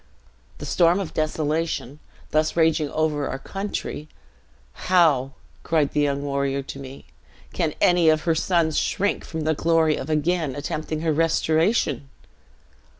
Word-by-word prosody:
'The - - -7
storm 175 +1 +3
of 190 -5 -5
desolation, 155 -2 -2 0.3
thus 155 0 +1
raging 160 -2 +2
over 150 -2 -1
our 135 - -3
country; 195 -1 -5 0.8
how,' 150 -8 +3 0.3
cried 155 -3 +1
the 150 - +1
young 140 -1 0
warrior 140 -1 -1
to 135 - -8
me, 135 0 -10 0.5
'can - - -1
any 175 -2 +4
of 155 0 +3
her 165 - +2
sons 160 -1 +1
shrink 200 +1 -1
from 160 -1 -5
the 155 +1 +1
glory 160 0 +2
of 135 - -6
again 155 -2 0
attempting 155 +2 -4
her 160 -1 +1
restoration?' 160 - +1
155 Hz, 140 wpm, -23 LUFS, 145-165 Hz, 0.8 s, any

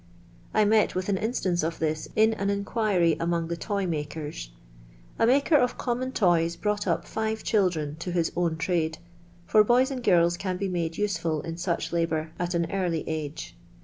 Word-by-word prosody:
I 215 - +3
met 215 0 +3
with 185 +2 -2
an 195 - +2
instance 195 -6 0
of 160 +1 -2
this 155 -1 -2
in 220 +1 +4
an 200 -2 -2
inquiry 200 -4 +1
among 170 0 -1
the 170 - -1
toy 200 +2 -2
makers. 150 - -4 0.7
A 225 - +4
maker 280 +5 +4
of 250 -2 +1
common 255 +1 -2
toys 170 -7 +2
brought 210 +3 -1
up - - 0
five 220 0 -3
children 170 -8 0
to 170 +2 -5
his 170 -2 0
own 170 -2 0
trade, 165 -1 0 0.5
for 215 +3 +5
boys 250 +5 +3
and 255 -2 -4
girls 175 -4 +4
can 185 -1 -3
be 195 +1 -2
made 165 -2 -2
useful 170 -7 -1
in 165 - -5
such 170 -1 -2
labour 160 -2 -1
at 175 0 -1
an 170 -1 0
early 180 -5 -1
age. 155 -2 -5
175 Hz, 180 wpm, -26 LUFS, 165-210 Hz, 0.7 s, for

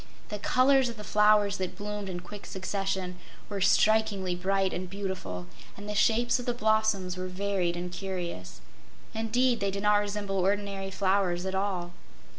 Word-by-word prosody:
The 210 - -4
colors 255 +3 +4
of 230 - -8
the 210 - -7
flowers 210 -1 +4
that 185 -1 -3
bloomed 205 -1 -4
in 175 -1 -4
quick 200 +3 -10
succession 190 -1 -3 0.3
were 200 -2 -3
strikingly 205 -1 +3
bright 190 +1 0
and 180 0 -4
beautiful, 185 - -4 0.3
and 205 +1 -8
the 210 - -3
shapes 235 +4 +3
of 245 - -7
the 245 - 0
blossoms 215 -5 +1
were 185 0 -3
varied 185 -2 -1
and 175 0 -4
curious. 175 - -5 0.5
Indeed, 235 +2 +1
they 200 - 0
did 200 +1 -4
not 210 0 +5
resemble 205 -1 -1
ordinary 195 0 0
flowers 185 -2 +1
at 190 - -2
all. 190 -3 -1
195 Hz, 165 wpm, -29 LUFS, 185-210 Hz, 0.5 s, not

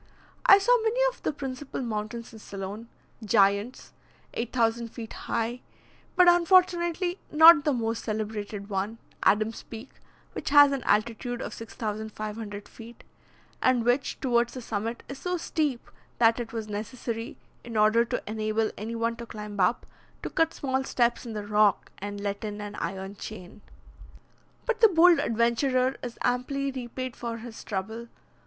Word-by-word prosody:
I 395 - +10
saw 485 +4 +3
many 450 +2 0
of - - -20
the - - 0
principal 270 -1 -6
mountains 230 +1 -4
in 220 - -11
Ceylon 200 +3 -7 0.4
giants, 205 +2 +2 0.4
8,000 235 -1 0
feet 230 -1 -8
high; 235 +2 -3 0.5
but, 360 -1 +6
unfortunately, 350 0 +3
not 320 -1 +8
the 300 - +3
most 230 -2 -2
celebrated 210 -2 -4
one, 205 +2 -2 0.2
Adam's 215 +2 +2
Peak, 225 +4 -10 0.4
which - - -4
has 290 0 +8
an 275 -2 -1
altitude 235 +3 0
of - - -5
6,500 215 -1 -6
feet, 230 +1 -13 0.6
and 250 -3 +3
which, 245 +3 +1
towards 240 -2 +1
the - - -4
summit 225 +2 -3
is 275 0 -8
so 360 0 -2
steep, 300 -6 -2 0.3
that 230 0 +4
it 235 -1 -5
was 225 -2 -4
necessary, 225 +4 -5 0.3
in 230 -2 -5
order 215 +2 +5
to 245 +1 -3
enable 215 0 -1
any 225 +3 -4
one 230 0 -1
to 235 0 -8
climb 210 -2 -7
up, 190 +6 +2 0.4
to - - -4
cut 325 0 +1
small 265 -1 -1
steps 240 -1 0
in 225 - -5
the 210 -1 -5
rock, 210 -1 +2
and 205 +1 -5
let 200 0 -3
in 210 -1 -5
an 205 0 -6
iron 195 +1 -4
chain. 205 -1 -9 1.0
But 480 -1 -1
the 450 - +9
bold 345 -1 +6
adventurer 250 +3 +1
is 245 -1 -6
amply 275 +3 0
repaid 255 -1 -5
for 235 -1 -5
his 230 0 -9
trouble. 220 +4 -4
230 Hz, 155 wpm, -27 LUFS, 215-265 Hz, 1.0 s, I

